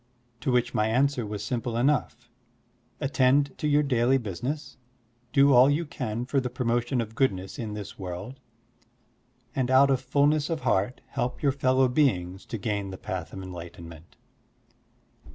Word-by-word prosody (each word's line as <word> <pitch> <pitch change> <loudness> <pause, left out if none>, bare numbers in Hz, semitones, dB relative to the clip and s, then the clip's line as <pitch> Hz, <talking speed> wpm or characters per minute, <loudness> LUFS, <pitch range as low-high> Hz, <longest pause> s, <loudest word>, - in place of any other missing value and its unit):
To 130 +1 -1
which 125 0 +1
my 105 - +2
answer 125 0 +1
was 105 0 -5
simple 120 +1 -2
enough: 140 +2 0 0.7
"Attend 140 0 +2
to 150 - -1
your 150 0 +3
daily 130 -1 +2
business, 125 - -5 0.5
do 140 0 +5
all 125 +2 +7
you 155 +4 +1
can 120 -5 -4
for 135 +2 +1
the 125 -1 -2
pro 125 0 -4
motion 120 +2 +1
of 110 -1 -6
goodness 95 -7 -1
in 110 -3 -4
this 105 -2 -8
world, 95 +8 -6 1.2
and 130 -2 0
out 135 +1 +5
of 130 - +1
fulness 145 +4 +2
of 165 -2 -2
heart 100 +7 0
help 125 0 -3
your 140 - +4
fellow 130 -1 +2
beings 95 - 0
to 115 - -4
gain 100 -2 -2
the 95 - -7
path 90 -3 -5
of 95 - -7
enlightenment. 85 -2 -10
125 Hz, 160 wpm, -27 LUFS, 105-135 Hz, 1.2 s, all